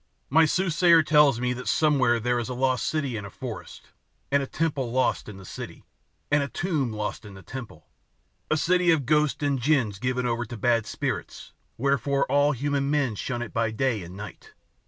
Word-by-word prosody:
My 160 Hz, +3 st, +6 dB
soothsayer 170 Hz, 0 st, +4 dB
tells 150 Hz, -5 st, +4 dB
me 125 Hz, 0 st, 0 dB
that 125 Hz, +1 st, -7 dB
somewhere 135 Hz, -6 st, +3 dB
there 120 Hz, +1 st, 0 dB
is 120 Hz, -, -4 dB
a -, -, -3 dB
city -, -, -7 dB
lost 130 Hz, +1 st, +1 dB, 0.3 s
in -, -, -8 dB
a 100 Hz, -, -7 dB
forest, -, -, -8 dB, 0.4 s
and 140 Hz, 0 st, +3 dB
a 135 Hz, -, -4 dB
temple 145 Hz, -7 st, -2 dB
lost 130 Hz, -3 st, 0 dB
in 100 Hz, -, -9 dB
the 95 Hz, -, -12 dB
city, -, -, -8 dB, 0.5 s
and 145 Hz, 0 st, +4 dB
a 140 Hz, -, -1 dB
tomb 150 Hz, -8 st, -1 dB
lost 105 Hz, +2 st, -4 dB
in 105 Hz, -2 st, -11 dB
the 95 Hz, -, -12 dB
temple; 130 Hz, +5 st, -9 dB, 0.6 s
a 155 Hz, -, +2 dB
city 180 Hz, +3 st, +2 dB
of 160 Hz, -5 st, +3 dB
ghosts 150 Hz, +1 st, +1 dB
and 140 Hz, -3 st, 0 dB
djins 120 Hz, -8 st, +1 dB
given 125 Hz, +1 st, -1 dB
over 120 Hz, 0 st, 0 dB
to 120 Hz, 0 st, -8 dB
bad 115 Hz, 0 st, +1 dB
spirits, -, -, -4 dB, 0.2 s
wherefore 140 Hz, +1 st, +1 dB
all 145 Hz, +1 st, +4 dB
human 140 Hz, +1 st, -1 dB
men 145 Hz, -5 st, +1 dB
shun 120 Hz, +3 st, -3 dB
it 115 Hz, -, -9 dB
by 115 Hz, -1 st, +1 dB
day 110 Hz, 0 st, 0 dB
and 90 Hz, +2 st, -9 dB
night. 105 Hz, +1 st, -10 dB
130 Hz, 200 wpm, -26 LUFS, 115-150 Hz, 0.6 s, My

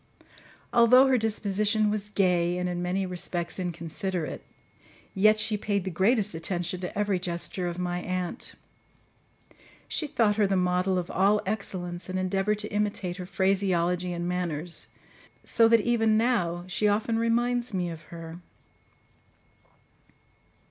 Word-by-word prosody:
Although 245 Hz, +2 st, +7 dB
her 265 Hz, -1 st, +3 dB
disposition 215 Hz, 0 st, +1 dB
was 210 Hz, -1 st, -3 dB
gay 180 Hz, -3 st, +1 dB
and 180 Hz, 0 st, -1 dB
in 175 Hz, 0 st, -3 dB
many 185 Hz, +2 st, -1 dB
respects 175 Hz, -1 st, -3 dB
inconsiderate, 170 Hz, -1 st, -3 dB, 0.7 s
yet 215 Hz, +2 st, +4 dB
she 215 Hz, 0 st, +1 dB
paid 200 Hz, -2 st, -1 dB
the 190 Hz, -, -4 dB
greatest 205 Hz, +4 st, +2 dB
attention 175 Hz, +2 st, -2 dB
to 180 Hz, +1 st, -6 dB
every 205 Hz, -3 st, +1 dB
gesture 175 Hz, +1 st, -3 dB
of 175 Hz, 0 st, -4 dB
my 180 Hz, 0 st, -2 dB
aunt. 185 Hz, +4 st, -4 dB, 1.3 s
She 310 Hz, -, -1 dB
thought 215 Hz, -6 st, +1 dB
her 210 Hz, -2 st, +3 dB
the 195 Hz, -, +1 dB
model 180 Hz, +1 st, +1 dB
of 180 Hz, -1 st, -3 dB
all 200 Hz, +3 st, +3 dB
excellence 185 Hz, -3 st, -4 dB
and 185 Hz, -, -2 dB
endeavoured 195 Hz, +3 st, 0 dB
to 210 Hz, -, -8 dB
imitate 205 Hz, -3 st, -1 dB
her 180 Hz, -2 st, -7 dB
phraseology 180 Hz, -2 st, +1 dB
and 175 Hz, 0 st, -3 dB
manners, 175 Hz, -2 st, -2 dB, 0.6 s
so 230 Hz, -, +4 dB
that 230 Hz, -1 st, +5 dB
even 225 Hz, -1 st, +2 dB
now 180 Hz, -8 st, +1 dB
she 185 Hz, +3 st, 0 dB
often 220 Hz, +2 st, +1 dB
reminds 240 Hz, +1 st, +1 dB
me 180 Hz, -3 st, -2 dB
of 160 Hz, -1 st, -10 dB
her. 165 Hz, 0 st, -9 dB
190 Hz, 140 wpm, -27 LUFS, 175-210 Hz, 1.3 s, Although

